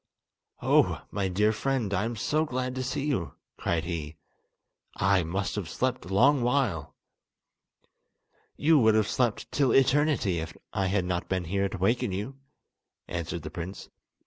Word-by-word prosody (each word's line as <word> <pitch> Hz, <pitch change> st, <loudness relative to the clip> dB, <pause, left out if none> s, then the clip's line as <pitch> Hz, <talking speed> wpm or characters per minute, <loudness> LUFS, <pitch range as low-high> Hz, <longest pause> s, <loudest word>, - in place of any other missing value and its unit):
"Oh, -, -, +3 dB
my 100 Hz, -1 st, -1 dB
dear 105 Hz, +4 st, +2 dB
friend, 120 Hz, -3 st, -1 dB
I 100 Hz, -, +1 dB
am 120 Hz, +1 st, -3 dB
so 150 Hz, +8 st, +1 dB
glad 130 Hz, -3 st, -2 dB
to 130 Hz, -, -3 dB
see 135 Hz, +2 st, -2 dB
you," 130 Hz, -, -2 dB, 0.2 s
cried 80 Hz, -2 st, -1 dB
he, 80 Hz, -3 st, -5 dB, 0.8 s
"I 95 Hz, -1 st, +3 dB
must 95 Hz, +4 st, -2 dB
have 95 Hz, -6 st, -3 dB
slept 130 Hz, +7 st, -1 dB
a 90 Hz, -, -9 dB
long 130 Hz, +8 st, +4 dB
while!" 120 Hz, -, 0 dB, 1.6 s
"You 155 Hz, 0 st, +5 dB
would 110 Hz, -3 st, +5 dB
have 110 Hz, -2 st, +3 dB
slept 120 Hz, -4 st, -1 dB
till 140 Hz, -3 st, +2 dB
eternity 135 Hz, -, +3 dB
if 80 Hz, +1 st, -6 dB, 0.2 s
I 95 Hz, -1 st, 0 dB
had 95 Hz, -1 st, +1 dB
not 90 Hz, -1 st, -2 dB
been 95 Hz, -1 st, 0 dB
here 100 Hz, +3 st, 0 dB
to -, -, -6 dB
waken 115 Hz, +4 st, +1 dB
you," 105 Hz, +9 st, -5 dB, 0.7 s
answered 85 Hz, -1 st, -4 dB
the 75 Hz, -, -6 dB
prince. 90 Hz, +4 st, -7 dB
100 Hz, 160 wpm, -28 LUFS, 90-130 Hz, 1.6 s, You